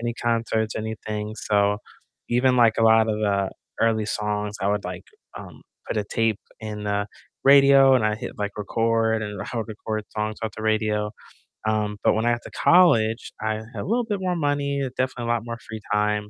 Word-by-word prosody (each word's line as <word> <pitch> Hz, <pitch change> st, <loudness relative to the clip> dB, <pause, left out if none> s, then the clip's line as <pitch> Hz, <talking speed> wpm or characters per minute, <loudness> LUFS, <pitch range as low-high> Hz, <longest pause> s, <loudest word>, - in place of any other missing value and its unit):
any 120 Hz, 0 st, -2 dB
concerts, 115 Hz, -2 st, -1 dB
anything 110 Hz, -1 st, -4 dB
so, 105 Hz, -1 st, +1 dB, 0.5 s
even, 125 Hz, +1 st, +3 dB
like, 115 Hz, -2 st, +4 dB
a -, -, +3 dB
lot 110 Hz, 0 st, +5 dB
of 110 Hz, -, 0 dB
the 100 Hz, -2 st, 0 dB, 0.3 s
early 110 Hz, -2 st, +2 dB
songs, 105 Hz, 0 st, -2 dB
I 100 Hz, -, 0 dB
would, 105 Hz, 0 st, 0 dB
like, 90 Hz, 0 st, -6 dB, 0.3 s
um, -, -, -10 dB, 0.2 s
put -, -, -3 dB
a 105 Hz, -, 0 dB
tape 110 Hz, 0 st, 0 dB, 0.2 s
in 105 Hz, -1 st, -6 dB
the 100 Hz, 0 st, -1 dB, 0.4 s
radio, 135 Hz, -1 st, +7 dB
and 125 Hz, -4 st, +3 dB
I 105 Hz, -, +1 dB
hit, 110 Hz, -, -8 dB
like, 105 Hz, -1 st, -2 dB
record, 115 Hz, +1 st, +1 dB
and 105 Hz, -2 st, -5 dB
I 120 Hz, -, -6 dB
would 115 Hz, 0 st, -3 dB
record 110 Hz, 0 st, -4 dB
songs 110 Hz, 0 st, -3 dB
off 110 Hz, -, -2 dB
the 110 Hz, -, -6 dB
radio. 110 Hz, -1 st, 0 dB, 0.6 s
Um, 105 Hz, -1 st, 0 dB
but -, -, +4 dB
when 110 Hz, +2 st, 0 dB
I 120 Hz, -, +3 dB
got 120 Hz, -, -1 dB
to -, -, -10 dB
college, 115 Hz, -11 st, +3 dB
I 110 Hz, 0 st, 0 dB
had 110 Hz, +3 st, -10 dB
a -, -, -7 dB
little 235 Hz, +5 st, 0 dB
bit 205 Hz, -3 st, -2 dB
more 180 Hz, -1 st, 0 dB
money, 145 Hz, -3 st, 0 dB, 0.2 s
definitely 130 Hz, -2 st, -2 dB
a 120 Hz, -, +1 dB
lot 115 Hz, -1 st, -2 dB
more 115 Hz, 0 st, -5 dB
free 110 Hz, -1 st, -9 dB
time, 105 Hz, 0 st, 0 dB
110 Hz, 205 wpm, -24 LUFS, 105-120 Hz, 0.6 s, radio